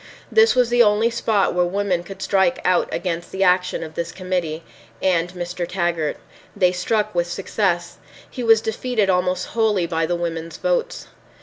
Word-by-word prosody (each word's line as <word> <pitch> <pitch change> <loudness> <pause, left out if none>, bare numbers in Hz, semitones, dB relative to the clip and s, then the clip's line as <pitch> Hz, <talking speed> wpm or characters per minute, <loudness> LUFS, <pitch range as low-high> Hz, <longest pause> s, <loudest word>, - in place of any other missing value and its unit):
This 450 0 +5
was 250 -2 +3
the 240 0 +4
only 220 +1 +3
spot 220 -3 +1
where 180 0 +2
women 185 0 0
could 190 +2 -9
strike 195 +7 +2
out 180 -1 +2
against 175 -2 -3
the 190 0 0
action 180 -1 +2
of 160 -1 -8
this 170 +1 -4
committee—and 170 -3 -3
Mr. 175 0 -4
Taggart. 170 -4 -1 0.4
They 180 -1 +3
struck 210 +4 -1
with 175 0 0
success. 175 -2 -1 0.3
He 250 - -6
was 225 -1 +5
defeated 220 -2 0
almost 180 0 0
wholly 215 -6 +1
by 165 -1 -1
the 175 - 0
women's 165 -1 -4
votes. - - -1
185 Hz, 165 wpm, -21 LUFS, 175-215 Hz, 0.4 s, This